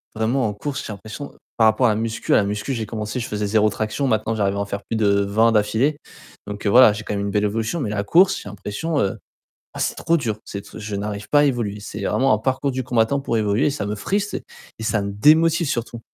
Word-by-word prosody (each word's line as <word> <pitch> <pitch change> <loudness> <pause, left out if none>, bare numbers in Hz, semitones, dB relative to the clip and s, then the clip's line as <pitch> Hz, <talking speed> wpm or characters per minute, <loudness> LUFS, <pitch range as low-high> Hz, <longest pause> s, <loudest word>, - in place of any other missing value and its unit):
vraiment 115 +2 +1
en 105 - -3
course 135 +5 -4
j'ai 105 - -5
l'impression 110 +7 -8 0.2
par 110 -1 +5
rapport 125 +4 +3
à - - +3
la 105 - +1
muscu 115 +1 -1
à - - +6
la 105 - +3
muscu 105 +6 -3
j'ai 110 -2 -3
commencé 110 +2 -4
je 115 - -4
faisais 105 0 -2
0 110 0 +3
traction 110 +6 -2
maintenant 110 -1 0
j'arrive 100 -2 0
à - - -2
en 100 - -1
faire 100 0 -5
plus 115 - -1
de 110 -1 +1 0.2
20 110 +3 +3
d'affilée 110 +8 +1 0.5
donc 105 +1 -7
heu - - +3
voilà 120 -2 +7
j'ai 110 +1 -6
quand 105 - -4
même 100 0 -2
une 100 - -2
belle 105 +1 +1
évolution 115 +9 -1
mais 110 - -2
la 100 -1 -1
course 185 - +5
j'ai - - -11
l'impression, 105 - -4
heu, 95 - -1 0.6
ah - - -6
c'est - - 0
trop 170 - +1
dur, 115 -8 -2
c'est 100 0 -6
t - - -12
je 105 -1 -4
n'arrive 105 0 -5
pas 145 - +5
à - - +4
évoluer. 115 -7 -1
C'est 105 0 -7
vraiment 135 -1 +2
un - - -1
parcours 130 +3 -1
du 130 0 -2
combattant 120 +2 +1
pour 120 -4 -1
évoluer, 110 +8 +1
ça 135 -8 -3
me 105 - -2
frustre 200 - -1 0.4
et 110 - -7
ça 110 -1 0
me 100 0 -4
démotive 160 - +4
surtout. 120 -1 -3
110 Hz, 260 wpm, -22 LUFS, 105-130 Hz, 0.6 s, voilà